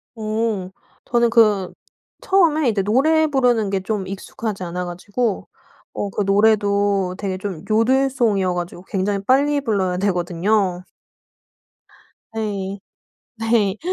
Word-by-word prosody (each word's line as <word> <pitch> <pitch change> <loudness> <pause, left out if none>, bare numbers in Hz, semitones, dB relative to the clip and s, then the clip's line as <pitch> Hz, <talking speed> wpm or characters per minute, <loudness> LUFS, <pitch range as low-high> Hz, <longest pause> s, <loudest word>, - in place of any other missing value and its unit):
오. 215 -3 -2 0.3
저는 235 -1 +2
그 210 -5 +3 0.5
처음에 320 -8 +3
이제 210 -3 0
노래 300 +10 +3
부르는 245 -7 +2
게 195 0 0
좀 195 -1 -3
익숙하지 195 +1 -5
않아 180 +1 -4
가지고 205 +5 -3 0.5
어 205 - -3
그 205 - -2
노래도 200 -2 +2
되게 195 -2 -3
좀 185 -4 -6
요들송이어 230 -4 +2
가지고 175 0 -5
굉장히 195 +1 -1
빨리 285 +3 +3
불러야 195 -7 0
되거든요. 180 0 0 1.5
네. 200 -3 -3 0.6
네. 225 -3 +1
205 Hz, 235 characters per minute, -21 LUFS, 190-230 Hz, 1.5 s, 그